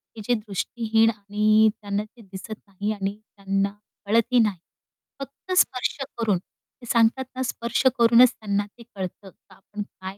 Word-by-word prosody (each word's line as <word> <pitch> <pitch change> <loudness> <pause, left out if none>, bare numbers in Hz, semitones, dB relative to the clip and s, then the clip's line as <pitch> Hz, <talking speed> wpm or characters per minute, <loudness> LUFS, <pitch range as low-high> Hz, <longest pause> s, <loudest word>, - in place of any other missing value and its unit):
की 220 - -8
जे 245 - +3
दृष्टिहीन 220 +1 +1
आणि 215 +1 +3
त्यांना 205 0 -2
ते 225 +3 -17
दिसत 195 +2 -8
नाही 200 +2 -3
आणि 200 -1 -3 0.2
त्यांना 195 0 0 0.4
कळतही 230 +4 +3
नाही. 210 -4 +2 0.6
फक्त 275 +7 -9
स्पर्श 255 -8 +2 0.2
करून 215 -5 +1
ते 240 +6 -18
सांगतात 235 +3 +3
ना, 260 - -3
स्पर्श 235 -1 -2 0.2
करूनच 235 +1 +7
त्यांना 205 -1 -2
ते 220 +3 -16
कळतं, 190 +1 -6
का - - -22
आपण 205 +2 -9
काय 190 -1 -10
215 Hz, 155 wpm, -24 LUFS, 200-235 Hz, 0.6 s, करूनच